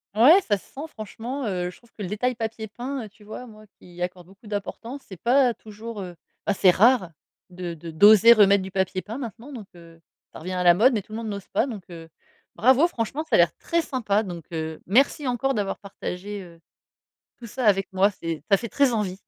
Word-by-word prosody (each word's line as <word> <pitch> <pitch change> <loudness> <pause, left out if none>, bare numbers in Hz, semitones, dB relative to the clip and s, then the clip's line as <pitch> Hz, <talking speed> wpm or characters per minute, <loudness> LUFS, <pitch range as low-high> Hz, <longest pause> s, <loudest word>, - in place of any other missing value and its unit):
Ouais, 305 - +7
ça 205 - 0
se - - -18
sent, 295 +4 -8
franchement, 235 +3 -6
heu, 180 -3 -2
je - - -13
trouve 235 -1 -25
que 210 - -12
le 185 - -3
détail 250 +6 -1
papier 225 -1 -5
peint, 250 +4 -5
heu, - - -11
tu 210 0 -21
vois, 220 +4 -8
moi, 215 -2 -14
qui 180 - -17
y 175 - -9
accorde 180 -1 -4
beaucoup 195 +4 -18
d'importance, 230 +6 -5
c'est 190 -4 -11
pas 250 0 +4
toujours, 215 0 -9
heu 180 -2 -8 0.3
bah, 205 - +3
c'est 185 -1 +5
rare. 215 -3 +4 0.4
De 175 -1 -5
de 165 +1 -9
d'oser 210 +7 +8
remettre 200 -3 +5
du 190 - -8
papier 190 -1 -1
peint 225 +4 -7
maintenant, 240 +3 -8
donc, 215 -6 -9
heu 165 -1 -16 0.3
ça - - -9
revient 180 +4 -6
à 180 0 -1
la 175 -1 +7
mode. 240 +8 +4
Mais 210 - 0
tout 215 - -21
le - - -4
monde 225 -2 -5
n'ose 200 -2 -6
pas. - - +2
Donc, 210 -7 -7
heu, 165 -1 -10 0.5
bravo, 265 +8 +5
franchement, 275 +1 -3
ça 320 - 0
a - - +6
l'air - - +4
très 335 -1 0
sympa! 220 -7 0
Donc, 175 -5 -7
heu, 160 -1 -5
merci 270 - +2
encore 270 +2 0
d'avoir 200 -2 -2
partagé, 200 0 -6
heu, 170 -1 -15 0.8
tout 235 - -10
ça 255 +2 -4
avec 195 -1 +3
moi. 195 +2 +3
C'est 165 -5 -5
ça 195 - +7
fait 235 +3 -6
très 275 0 +2
envie! 200 -3 -2
210 Hz, 235 wpm, -24 LUFS, 185-240 Hz, 0.8 s, d'oser